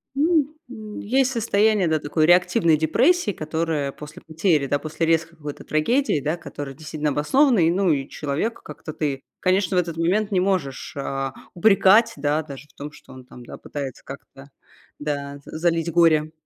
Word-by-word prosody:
Ну, 305 0 +2
м, 215 -4 -8
есть 260 +4 +1
состояние, 215 -4 +2
да, 160 0 +2
такой 155 +1 0
реактивной 175 -2 +4
депрессии, 235 - +2
которая 155 -3 -2
после 150 +5 -11
потери, 160 -2 +1
да, 145 +1 0
после 155 +2 -3
резкой 165 0 0
какой-то 145 -2 -8
трагедии, 230 - +1
да, 150 +5 -1
которая 145 -5 -8
действительно 155 0 -3
обоснована. 235 - +3
И, 165 0 +4
ну, 185 +1 +1
и 140 -2 0
человека, 155 +11 -3
как-то, 155 - -9
ты, 140 -3 -3 0.2
конечно, 185 +1 +1
в - - +5
этот 170 -2 -5
момент 195 +6 +1
не 190 -3 +2
можешь, 180 -8 -2
а, 135 -1 -3 0.2
упрекать, 210 +4 +5
да, 145 +2 0
даже 145 -1 -10
в - - -27
том, 145 +1 -8
что - - -16
он 130 -1 -12
там, 125 0 -13
да, - - -9
пытается 140 -3 -7
как-то, 135 +1 -12 0.5
да, 145 -1 -4
за - - -8
залить 165 0 0
горе. 155 -2 +3
160 Hz, 175 wpm, -23 LUFS, 145-195 Hz, 0.5 s, в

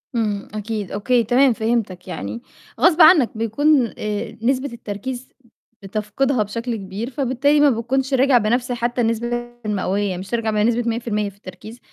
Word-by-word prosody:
إمم، 210 -3 -1
أكيد، 210 -2 -4
أوكي، 235 +4 +1
تمام 250 +3 +4
فهمتاك. 220 -5 -2
يعني 185 +6 -5 0.4
غصب 345 -1 +4
عنك 315 -6 +7
بيكون 245 +3 +2 0.5
نسبة 260 +1 0
التركيز 240 +3 -6 0.5
بتفقدها 215 +5 -1
بشكل 230 +3 -4
كبير، 200 +4 -5
فبالتالي 275 +2 +1
ما 290 -1 +6
بتكونش 260 +3 -1
راجع 265 -1 +4
بنفس 240 +3 0
حتى 240 0 -1
النسبة 230 +1 0 0.4
المئوية 200 -2 -1
مش 190 +1 -8
هترجع 230 -2 -1
بنسبة 230 +3 +1
100% 225 -3 -2
في 200 - -20
التركيز، 205 +5 -11
230 Hz, 140 wpm, -21 LUFS, 210-255 Hz, 0.5 s, عنك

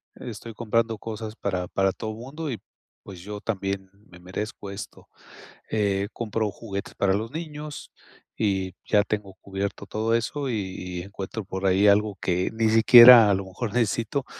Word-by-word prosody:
estoy 115 -1 -8
comprando 115 0 0
cosas 110 -1 -6
para 90 -3 -2
para 95 -1 +1
todo 110 -1 -5
el 110 - -8
mundo 140 +5 -6
y, 115 - -5 0.4
pues, 90 -3 -10
yo 105 +2 -7
también 95 -3 -3 0.2
me 90 0 -15
merezco 100 +2 -6
esto", 100 +2 -9 0.6
eh, 100 -1 0
compro 110 -2 -2
juguetes 100 -3 -6
para 95 -1 +1
los 110 +4 -3
niños 150 -2 -7 0.5
y 95 -3 0
ya 105 -1 +4
tengo 100 -2 -4
cubierto 100 +1 -4
todo 110 +2 -1
eso 135 +5 -1
y - - -1 0.2
y 90 -1 -5
encuentro 100 +2 -6
por 95 0 -5
ahí 95 +2 +4
algo 100 -1 +3
que 90 0 0
ni 110 0 +1
siquiera 115 0 +9
a - - +4
lo 95 0 -2
mejor 100 +3 -5
necesito. 120 +3 0
105 Hz, 165 wpm, -25 LUFS, 95-115 Hz, 0.6 s, siquiera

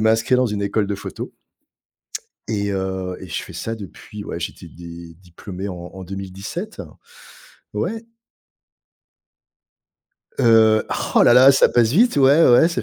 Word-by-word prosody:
m'inscrire 110 +3 +2
dans 125 - +2
une 105 -2 -3
école 100 0 -1
de 100 - -2
photo. - - -7 1.2
Et 100 -2 -1
heu 95 -1 -3
et - - -10
je - - -4
fais - - -11
ça 115 - -4
depuis 105 0 -10
ouais, 85 - -6
j'étais 85 0 -7
dé 85 0 -11
diplômé 90 +2 -9
en 95 - -5 0.2
en 95 -1 -9
2017. 95 - -7 0.9
Ouais. 225 +1 -3 2.4
Heu 110 -3 +5 0.3
oh - - +7
là - - +6
là! 130 +2 +8
Ça 135 - +4
passe 115 -2 +2
vite 235 +5 +3
ouais, 140 +4 +5
ouais, 125 +7 +6
ça 170 - -3
105 Hz, 145 wpm, -20 LUFS, 95-125 Hz, 2.4 s, là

